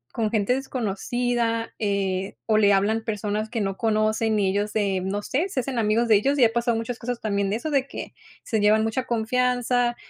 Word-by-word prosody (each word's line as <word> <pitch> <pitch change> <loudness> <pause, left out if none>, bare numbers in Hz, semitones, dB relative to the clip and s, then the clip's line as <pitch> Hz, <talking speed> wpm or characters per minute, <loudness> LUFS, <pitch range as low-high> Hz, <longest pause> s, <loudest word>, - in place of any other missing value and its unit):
con 220 -2 0
gente 220 +2 +1
desconocida, 240 -1 -2
eh, 195 -2 -1
o, 215 -1 +3
le 205 -1 +5
hablan 215 +3 +1
personas 210 0 -2
que 230 -1 -2
no 195 -1 -2
conocen 215 0 +1
y 195 - +2
ellos, 205 +1 -1
eh, 195 -3 +1
no 200 +2 -2
sé, 325 +9 -1
se 270 - -1
hacen 250 -2 -3
amigos 225 +2 +2
de 220 - +5
ellos, 275 +8 +2
y 250 - +6
ha 225 - +1
pasado 235 -1 +1
muchas 230 +1 -4
cosas 245 0 -4
también 200 -2 0
de 200 - 0
eso. 310 +5 -4
De 275 -1 +1
que - - -7 0.3
se 220 - -1
llevan 215 +1 +4
mucha 225 +3 -1
confianza, 245 +1 +1
220 Hz, 210 wpm, -24 LUFS, 205-245 Hz, 0.3 s, y